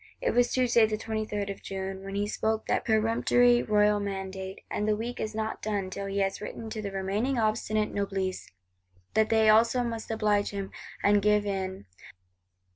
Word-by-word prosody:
It - - 0
was 245 0 +3
Tuesday 240 -3 +4
the 215 0 -2
23d 215 -2 -3
of 195 - -9
June, 190 0 -5
when 195 0 -6
he 205 +1 0
spoke 220 +1 -1
that - - 0
peremptory 230 +2 +3
royal 210 -1 +3
mandate; 190 -1 -5
and 210 - -2
the 215 - +3
week 235 +3 -5
is 215 0 -3
not 220 0 -3
done 200 -3 -2
till 200 +1 -4
he 195 0 -3
has 195 +1 -1
written 220 +1 -6
to 215 - -4
the 200 - -4
remaining 200 +7 -1
obstinate 215 -1 0
Noblesse, 195 -2 -2 0.6
that 220 0 +3
they 220 -1 +4
also 230 +3 +5
must 230 -2 -4
oblige 210 -2 +1
him, 200 -1 -5 0.3
and 205 0 +4
give 210 0 +3
in. 190 - -3
210 Hz, 180 wpm, -28 LUFS, 195-220 Hz, 0.6 s, also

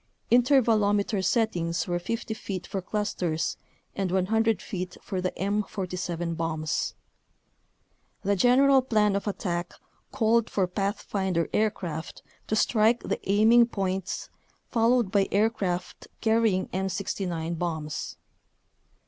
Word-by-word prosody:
Intervalometer 220 -5 +3
settings 175 -5 0
were 175 -1 0
50 230 +5 -3
feet 190 -4 -5
for 195 - -4
clusters 180 -5 -2 0.4
and 195 -2 -1
100 220 +4 +2
feet 180 -1 -5
for 190 -2 -4
the 185 - 0
M47 185 -4 -2
bombs. 160 -2 -2 1.3
The 200 +1 +2
general 265 +6 +5
plan 215 -5 +2
of 200 - -2
attack 175 -3 -3 0.4
called 230 -2 +2
for 195 - +1
pathfinder 190 -2 -1
aircraft 175 -7 -2 0.2
to 215 - 0
strike 220 +1 +3
the - - -2
aiming 225 +4 +6
points, 190 -4 -3 0.4
followed 235 -3 +3
by 200 -1 +3
aircraft 200 -4 -1
carrying 220 -4 +2
M69 180 -3 -3
bombs. 160 -3 -3
195 Hz, 105 wpm, -27 LUFS, 180-220 Hz, 1.3 s, aiming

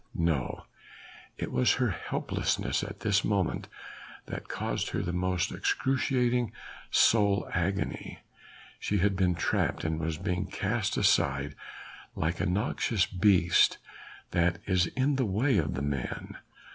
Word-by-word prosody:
No! 80 -6 -1 0.7
it - - -4
was 65 0 +3
her - - +1
helplessness - - -1
at - - -7
this 100 -2 +2
moment 100 -5 0 0.6
that - - -7
caused - - -2
her - - -2
the 90 - -3
most 90 -1 0
excruciating 125 -3 +1 0.4
soul 100 -3 +4
agony. 95 +3 -2 0.6
She 105 - 0
had 100 +1 +2
been 90 -2 +2
trapped 85 - 0
and 80 0 -1
was 80 -1 -2
being 90 +1 -2
cast 100 +3 -1
aside 70 +1 +2 0.6
like 80 +2 -1
a 100 - 0
noxious 100 +1 +1
beast, 90 -2 +4 0.5
that 85 +2 +2
is 90 -2 +2
in 135 +5 0
the 130 - +1
way 115 +6 +2
of 75 -5 -1
men. 70 -2 -4
95 Hz, 130 wpm, -29 LUFS, 85-105 Hz, 0.7 s, soul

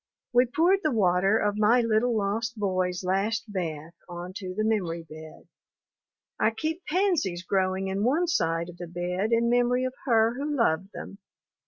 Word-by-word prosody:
We 245 +1 +5
poured 345 +10 +3
the 310 - +1
water 195 -3 +2
of 205 0 0
my 230 +4 +4
little 230 +1 +1
lost 220 +3 -2
boy's 185 -3 -1
last 200 +5 0
bath 165 -3 -4 0.2
onto 185 +2 -7
the 215 - 0
memory 180 -7 -1
bed. 155 0 -12 0.9
I - - +4
keep 315 +10 -4
pansies 310 - 0
growing 190 0 0
in 195 +1 -2
one 295 +9 +2
side 165 - 0
of 175 - -11
the 175 - -7
bed 180 +5 -2
in 230 0 +3
memory 245 +1 +2
of 255 - -3
her 225 -1 +4
who 295 +1 -2
loved 190 -5 +1
them. 200 - -9
205 Hz, 165 wpm, -27 LUFS, 180-240 Hz, 0.9 s, We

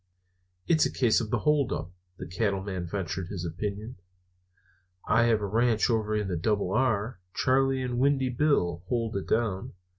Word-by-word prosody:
"It's 160 -2 +4
a - - -7
case 120 -4 +2
of 110 - -4
hold 140 +3 +1
up," 85 +3 -4 0.3
the - - -6
Cattleman 95 -2 -2
ventured 95 -1 -3
his 90 -3 -5
opinion. 105 +7 -5 1.1
"I 115 +3 +4
have 115 -2 +2
a - - -1
ranch 115 +2 +2
over 110 -1 0
in 105 -2 -1
the 90 - -2
Double 100 +1 0
R. 110 -1 0 0.2
Charley 135 0 +2
and 125 -1 -2
Windy 135 -1 +2
Bill 120 - +1
hold 115 -2 -1
it 100 - -3
down. 110 -5 -1
110 Hz, 160 wpm, -28 LUFS, 95-125 Hz, 1.1 s, It's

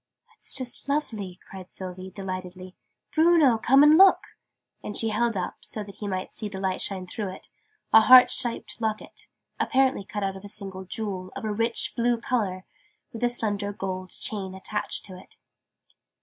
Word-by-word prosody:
"'It's - - -2
just 255 +1 -3
lovely," 215 -11 -2
cried 190 -1 -11
Sylvie, 185 0 -7
delightedly. 185 -1 -7 0.4
"Bruno, 315 -7 +5
come 270 +5 +5
and 305 +3 +7
look!" 385 0 +6 0.5
And 210 - -5
she 225 - +2
held 225 0 0
up, 180 - -4
so 215 - -4
that 200 -1 -12
he 210 - -5
might 185 -1 -4
see 210 - +1
the 190 -1 -7
light 190 -1 -1 0.3
through 200 0 -4
it, 185 - -10 0.4
a 220 - +9
heart 250 +2 +8
shaped 235 0 -3
Locket, 220 -1 -4 0.3
apparently 265 -5 +2
cut 205 +1 -5
out 195 0 -2
of 190 - -10
a 205 - -8
single 195 -2 -7
jewel, 185 -2 -5
of - - -5
a 215 - -1
rich 230 +2 +1
blue 240 0 +1
colour, 210 -7 -2 0.5
with 230 - -6
a 240 - +4
slender 205 -4 -1
gold 185 -2 -5
chain 190 -2 -4
attached 210 +2 -3
to 190 - -10
it. 180 - -14
205 Hz, 175 wpm, -26 LUFS, 190-235 Hz, 0.5 s, a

